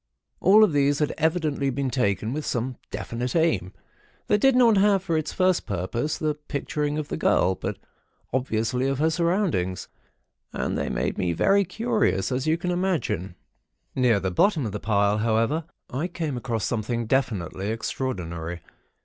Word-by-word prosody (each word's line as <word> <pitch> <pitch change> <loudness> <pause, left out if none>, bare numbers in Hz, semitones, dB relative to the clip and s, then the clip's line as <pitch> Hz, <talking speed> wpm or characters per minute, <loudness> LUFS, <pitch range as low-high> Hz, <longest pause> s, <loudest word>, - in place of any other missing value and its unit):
All 210 +3 +6
of 200 -7 +3
these 145 0 +3
had 150 0 0
evidently 155 -4 +1
been 135 0 -2
taken 110 -2 0
with 155 +1 -3
some 125 -1 -2
definite 115 - -4
aim, 115 - +1 0.5
that 210 0 +2
did 270 -1 +5
not 235 -4 +5
have 195 -1 +4
for 170 -4 -1
its 155 -1 -1
first 185 -1 +1
purpose 100 - -2
the 155 -1 0
picturing 150 0 -3
of 150 -1 -4
the - - -3
girl, 95 - +3
but - - -4 0.6
obviously 125 0 0
of 135 -1 0
her 160 +3 +2
surroundings; 170 - 0 0.6
and - - -2
they - - -2
made - - -2
me 85 -1 +1
very 200 - +3
curious, 195 - 0
as 130 +3 -1
you 160 +1 +3
can 180 +1 -2
imagine. 175 - -1 0.6
Near 125 -5 +3
the 95 -1 -2
bottom 155 - +2
of 110 - -3
the 105 - -4
pile, 100 -1 +2
however, 115 +8 +1 0.3
I 140 +7 -1
came 160 -5 -3
upon 120 -2 -3
something 115 +1 -1
definitely 105 - -1
extraordinary. 90 -8 -4
135 Hz, 165 wpm, -25 LUFS, 105-165 Hz, 0.6 s, All